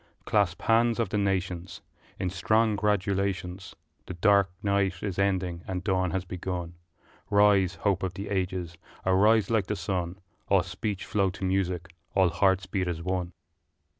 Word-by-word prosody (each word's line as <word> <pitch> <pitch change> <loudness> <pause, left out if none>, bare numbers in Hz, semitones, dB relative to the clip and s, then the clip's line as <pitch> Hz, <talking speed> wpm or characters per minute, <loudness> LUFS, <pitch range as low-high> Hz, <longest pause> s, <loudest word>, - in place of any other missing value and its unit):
Clasp 100 -5 +1
hands 115 +1 +3
of 115 -5 +1
the 105 - -1
nations 90 -3 -2 0.4
In 90 - -2
strong 110 +4 +2
gratulations: 100 -2 -1 0.3
The 90 - -6
dark 100 +1 +4
night 100 -4 0
is 100 -3 -3
ending 95 -3 0
and 90 -1 -3
dawn 95 -2 +1
has 95 +2 -2
begun; 90 -1 -4 0.6
Rise, 100 -3 +4
hope 95 +1 0
of 95 -1 -3
the 100 +2 -5
ages, 90 -3 -2 0.3
arise 105 +3 +4
like 110 -4 +2
the 105 - -1
sun, 90 -1 -3 0.3
All 95 -3 +4
speech 95 +2 -4
flow 100 -2 +1
to 95 +1 -5
music, 95 -2 -1 0.2
all 95 -2 +5
hearts 95 +2 +2
beat 95 -1 -2
as 85 -1 -3
one! 90 -1 -2
95 Hz, 155 wpm, -28 LUFS, 90-100 Hz, 0.6 s, all